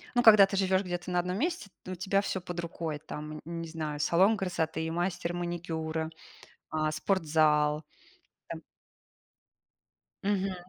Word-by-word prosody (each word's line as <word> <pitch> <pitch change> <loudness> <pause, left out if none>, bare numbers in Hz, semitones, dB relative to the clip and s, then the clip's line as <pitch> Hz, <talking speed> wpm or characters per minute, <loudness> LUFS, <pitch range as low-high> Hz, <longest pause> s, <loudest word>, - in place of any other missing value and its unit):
ну, 245 - +4
когда 210 -3 +9
ты 195 0 -3
живёшь 190 -1 +3
где-то 175 0 -4
на 180 - +2
одном 180 +2 -1
месте, 335 - -1 0.2
у 185 - -4
тебя 195 +2 +1
всё 190 -2 -2
под 175 0 -6
рукой. 165 -3 -4
Там, 150 0 -7
н 170 0 -5
не 165 - -5
знаю, 155 -2 -4
салон 190 +8 +4
красоты, 160 -3 -1
мастер 175 0 -1
маникюра, 165 -2 -3 0.6
а, 155 0 0
спортзал, 155 -3 +2 0.6
там - - -6 1.6
Мгм. 195 -1 0
175 Hz, 140 wpm, -30 LUFS, 160-190 Hz, 1.6 s, когда